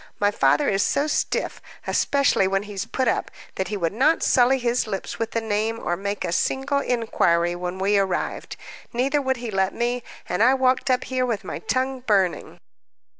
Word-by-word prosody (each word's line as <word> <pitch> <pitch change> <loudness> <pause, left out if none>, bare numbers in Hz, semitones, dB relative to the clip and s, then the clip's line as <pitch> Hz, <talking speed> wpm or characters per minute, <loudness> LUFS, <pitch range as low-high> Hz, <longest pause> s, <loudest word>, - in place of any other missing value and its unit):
"My 205 0 +3
father 285 +7 +2
is 195 0 +2
so 285 - +1
stiff, 305 - -1 0.2
especially 280 -9 +2
when 195 +1 0
he's 205 0 -5
put 260 +1 -1
up, - - 0 0.2
that 190 - -3
he 210 +2 -3
would 170 -2 -1
not 285 +9 +2
sully 255 +1 +4
his 240 -2 0
lips 195 -3 -5
with 230 -1 -1
the 230 - -2
name, 220 +1 -1
or 175 - -1
make 200 +1 -3
a 170 - -2
single 270 +9 0
inquiry 175 -9 +1
when 180 +1 -4
we 200 +2 +2
arrived; 190 -2 -2 0.4
neither 270 +5 +1
would 265 -1 0
he 235 -2 -5
let 190 -1 0
me, 245 +1 -1 0.3
and 180 - -1
I 255 +4 +5
walked 260 0 +1
up 255 -1 +2
here 255 -1 -1
with 225 -4 -2
my - - -5
tongue 260 0 -1
burning." 200 -7 0
225 Hz, 190 wpm, -23 LUFS, 195-260 Hz, 0.4 s, I